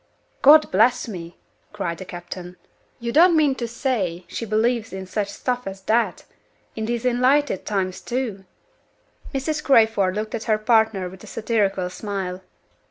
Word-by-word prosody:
"God 305 +2 +7
bless 235 +6 +3
me!" 175 -5 -8 0.4
cried 170 -1 -3
the 185 - -7
captain, 175 0 -8 0.4
"you 235 -1 -3
don't 335 +4 +6
mean 295 -3 +4
to 240 -3 -4
say 215 - -2
she 230 - -5
believes 225 +1 +1
in 190 0 -6
such 200 +2 -2
stuff 245 +3 -3
as 195 0 -7
that? 225 +4 0 0.5
In 220 -1 -3
these 240 +1 -2
enlightened 255 -1 +2
times 190 -3 -2
too!" 235 -6 -3 0.9
Mrs. 295 +3 -2
Crayford 220 -7 +4
looked 215 +1 -3
at 225 - -4
her 215 -1 +2
partner 220 -3 +2
with 185 +1 -12
a - - -11
satirical 205 -5 0
smile. 190 -2 -4
220 Hz, 155 wpm, -23 LUFS, 190-245 Hz, 0.9 s, God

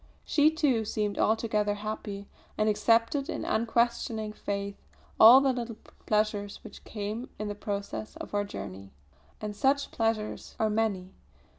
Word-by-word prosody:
She, 300 0 +4
too, 290 -8 +1
seemed 210 -1 -2
altogether 215 -2 +1
happy, 205 -1 -5 0.3
and 215 - +2
accepted 230 +6 +2
in - - -3
unquestioning 230 -1 0
faith 200 -1 -4 0.4
all 240 +5 +10
the 270 -1 +3
little 235 -2 -4 0.3
pleasures 210 -1 0
which - - -11
came 215 +3 -5
in 210 0 -3
the - - -2
progress 205 +1 -5
of - - -8
our 205 0 +1
journey. 100 - -8 0.5
And 210 -1 -4
such 280 +4 +1
pleasures 225 -2 -2
are 220 -1 +2
many. 200 -4 -1
215 Hz, 140 wpm, -29 LUFS, 205-230 Hz, 0.5 s, all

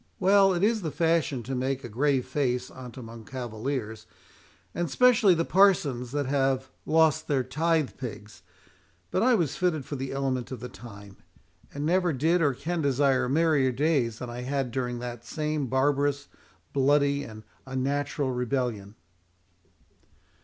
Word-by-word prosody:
Well, 195 +1 +5
it 175 - -1
is 220 +1 +2
the 165 - -2
fashion 160 -5 0
to 130 +4 -5
make 130 +1 -2
a - - -5
grave 130 +3 +1
face 125 -3 -1
on't 125 -2 -10
among 115 -2 -9
cavaliers, 115 -2 -5 0.7
and 175 -2 -2
specially 225 - +5
the 165 0 0
parsons 150 -11 +3
that 145 0 -1
have 135 -1 0 0.2
lost 160 -1 +3
their 140 -4 +1
tithe 155 +3 0
pigs; 110 -4 -8 0.7
but - - +1
I 250 +1 +4
was 155 - -1
fitted 160 -7 0
for 145 - -5
the 135 0 -4
element 135 -2 -2
of 130 - -5
the 125 - -7
time, 100 -3 -12 0.5
and 145 +1 -4
never 175 0 +2
did 165 +6 +2
or 145 -5 +2
can 165 +5 -3
desire 135 -2 +2
merrier 150 -3 +3
days 130 -4 +1
than 125 - -6
I 120 +1 -6
had 135 -1 -2
during 125 -1 -2
that 120 -1 -6
same 150 0 -2
barbarous, 140 +2 +1 0.4
bloody, 140 +1 +3
and 110 0 -10 0.2
unnatural 135 +1 -1
rebellion." 125 -5 -2
135 Hz, 155 wpm, -27 LUFS, 125-155 Hz, 0.7 s, Well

